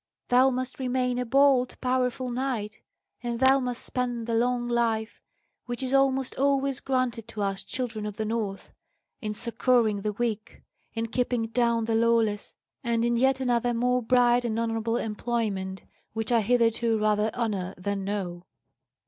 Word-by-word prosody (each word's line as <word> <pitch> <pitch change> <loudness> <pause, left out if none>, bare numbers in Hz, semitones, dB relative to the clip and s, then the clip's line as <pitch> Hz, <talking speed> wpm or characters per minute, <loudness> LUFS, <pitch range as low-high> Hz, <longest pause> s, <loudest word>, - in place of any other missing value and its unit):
Thou 255 +2 +5
must 255 +1 -3
remain 250 -1 0
a 250 - -2
bold, 270 0 +3
powerful 255 0 0
knight, 240 -4 -3 0.4
and 240 -1 -3
thou 265 +1 +5
must 250 -2 -3
spend 245 -2 -2
the 230 - -2
long 240 +1 +1
life, 230 -2 -1 0.5
which 245 +2 -3
is 260 +1 -1
almost 270 -1 +2
always 275 -1 +2
granted 255 -4 -1
to 220 -3 -4
us 195 -1 -2
children 225 -1 -3
of 210 - -7
the 220 - -2
North, 215 -3 -3 0.5
in 210 -1 -3
succouring 230 -2 +2
the 210 +1 -2
weak, 220 -1 -3 0.3
in 225 0 -1
keeping 240 -1 -1
down 235 -1 +1
the 225 - -1
lawless, 225 -2 +1 0.3
and 235 -1 +1
in 240 0 +2
yet 265 +2 +3
another 245 -2 +1
more 250 +1 +1
bright 245 +1 +3
and 225 -2 -2
honourable 225 0 -1
employment 210 -4 -2 0.3
which 225 +1 -3
I 235 -2 +4
hitherto 230 0 +2
rather 210 0 +2
honour 200 -6 -2
than 195 +2 -3
know." 185 -3 -4
235 Hz, 155 wpm, -27 LUFS, 220-250 Hz, 0.5 s, Thou